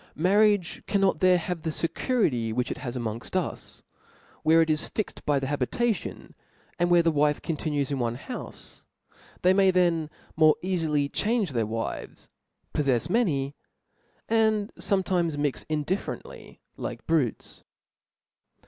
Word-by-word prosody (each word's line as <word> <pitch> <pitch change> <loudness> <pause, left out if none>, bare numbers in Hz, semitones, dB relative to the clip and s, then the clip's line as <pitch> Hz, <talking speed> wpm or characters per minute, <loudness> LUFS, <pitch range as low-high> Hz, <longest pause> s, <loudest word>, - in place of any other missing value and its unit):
Marriage 200 +2 +3
cannot 195 -5 +2
there 185 0 +5
have 175 0 -4
the 160 - -2
fecuriry 160 - 0
which 125 +3 -1
it - - -5
has 125 -2 -4
arnongft: 115 +5 -5
us, 185 - -3 0.6
where 165 +1 +5
it 160 - -4
is 155 - 0
fixed 215 - -4
by 145 -1 +3
the 135 - -1
habitation, 145 - -2 0.5
and 175 0 +2
where 175 -1 +5
the 165 - +3
wife 150 -1 +2
continues 150 -3 -2
in 140 - -1
one 120 -1 -1
houfe 245 - -6
•, - - -15 0.6
they 185 +1 +6
may 195 0 +5
then 170 -4 +2 0.3
more 155 -1 +6
eafily 160 -6 0
change 215 -5 +1
their 115 -4 0
wives, 115 +1 -5 0.4
poflfefs 140 +2 +1
many, 145 - +1 0.7
and 220 -2 +2
fometimes 180 -5 0
mix 145 -2 -2
indifferently 155 +5 -4 0.2
like - - -6
brutes. 150 -8 -1
160 Hz, 140 wpm, -27 LUFS, 140-190 Hz, 0.7 s, they